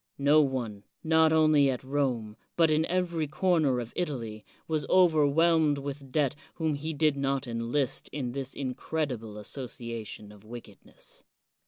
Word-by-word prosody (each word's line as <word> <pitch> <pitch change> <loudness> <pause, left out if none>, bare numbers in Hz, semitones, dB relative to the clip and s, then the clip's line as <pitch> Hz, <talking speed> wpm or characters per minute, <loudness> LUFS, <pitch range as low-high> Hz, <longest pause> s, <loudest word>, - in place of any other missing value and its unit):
No 145 +2 +5
one, 120 -8 -2 0.2
not 160 0 +4
only 155 -3 +5
at 130 -1 -3
Rome, 130 -6 -1 0.2
but 165 -2 +4
in 155 +1 +2
every 170 -3 -1
comer 155 -4 +2
of 120 -1 -6
Italy, 115 -11 -4 0.2
was 155 -3 -1
overwhelmed 160 -2 +4
with 140 -1 -7
debt 145 0 +1 0.2
whom 160 -2 0
he 150 +3 -4
did 155 -1 +2
not 140 0 -1
enlist 120 +3 -2
in 130 -4 -3
this 135 0 -5
incredible 130 -4 -3
association 115 -2 -7
of 105 -1 -15
wi(!ked« 110 -2 -11
ness. - - -11
140 Hz, 145 wpm, -28 LUFS, 120-155 Hz, 0.2 s, No